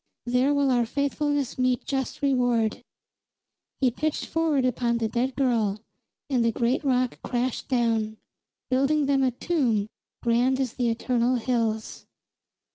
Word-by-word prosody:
There 250 +3 +2
will 285 -2 +2
our 240 -2 +2
faithfulness 285 0 -1
meet 255 -1 +1
just 270 +1 -3
reward!" 245 -5 +1 1.0
He 255 -2 +4
pitched 305 +5 -2
forward 315 -5 +1
upon 240 -1 +1
the 225 -1 0
dead 245 +4 -1
girl, 230 -7 +1 0.5
and 255 -5 +1
the 230 - +2
great 240 +5 0
rock 255 -2 +1
crashed 245 0 -2
down, 225 -4 0 0.5
building 275 +3 +2
them 275 -1 +2
a 260 - +3
tomb 245 - 0 0.4
grand 245 +3 +2
as 260 -4 -1
the 245 -2 0
eternal 240 +2 +1
hills. 230 -3 -2
250 Hz, 135 wpm, -26 LUFS, 235-270 Hz, 1.0 s, He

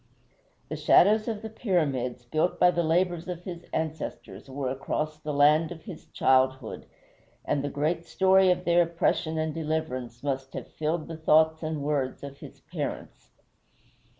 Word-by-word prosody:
The 155 - -3
shadows 205 +8 +4
of 220 -2 -3
the 220 - -5
Pyramids, 140 - -1
built 155 +8 0
by 180 0 +6
the 170 - 0
labors 175 +1 +1
of 175 -1 -5
his 175 -2 -7
ancestors, 150 -9 -5
were 135 -1 -3
across 155 +3 -3
the 155 -1 -4
land 150 +3 +4
of 165 -2 -9
his 185 -8 -10
childhood, 130 -2 +1 0.6
and 140 -1 0
the 145 - -2
great 155 +4 -1
story 190 0 +4
of 180 - +1
their 175 0 +5
oppression 165 -1 0
and 155 -1 -1
deliverance 150 -7 -3
must 135 -1 -3
have - - -7
filled 155 +1 -2
the 165 -1 -6
thoughts 160 0 +3
and 155 -2 -3
words 140 -3 -1
of 140 0 -8
his - - -12
parents. - - -6
155 Hz, 160 wpm, -27 LUFS, 140-170 Hz, 0.6 s, by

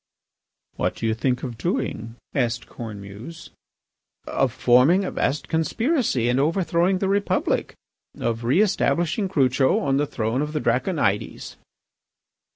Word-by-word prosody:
"What - - -1
do - - -5
you 110 - +2
think 125 +2 -1
of 120 -4 -5
doing?" 115 - -2 0.2
asked 120 -4 0
Cornemuse. 110 +7 -9 0.7
"Of 135 -2 0
forming 130 +12 +4
a - - -3
vast 145 - -1
conspiracy 205 - 0
and 125 +2 +2
overthrowing 170 +4 +2
the 195 - -1
Republic, 200 +1 0 0.4
of 115 0 -2
re 130 - +3
establishing 190 -1 0
Crucho 130 -5 +2
on 135 -1 +1
the 145 +1 +1
throne 115 +2 -1
of 150 +1 -3
the 150 - 0
Draconides." 130 - -1
135 Hz, 130 wpm, -23 LUFS, 120-175 Hz, 0.7 s, forming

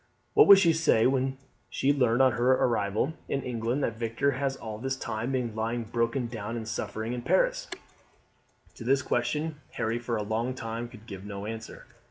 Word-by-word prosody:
What 430 - +7
would 200 - +11
she 170 -4 +4
say 155 -8 +3
when 130 0 +1 0.3
she 140 +2 +2
learned 125 -2 +3
on 130 - +5
her 120 +2 +3
arrival 115 +2 +1 0.2
in 135 -1 -1
England 120 +3 -1
that 115 -2 -2
Victor 115 +4 +1
has 135 0 -1
all 110 -4 -7
this 130 +2 -2
time 115 -1 -3
been 125 -4 -1
lying 115 +2 -2
broken 115 +3 -1
down 115 -1 -5
and - - -3
in - - -7
suffering 110 +1 -3
in 125 - -3
Paris?" - - +1 1.1
To - - -8
this 135 +3 +2
question 150 +7 -1
Harry, 115 +2 -1
for 120 -1 -2
a 105 - -2
long 115 +4 -2
time, 115 -1 -4
could 115 -2 -14
give 95 -5 -8
no 100 0 -6
answer. 110 +1 -7
120 Hz, 195 wpm, -28 LUFS, 110-135 Hz, 1.1 s, would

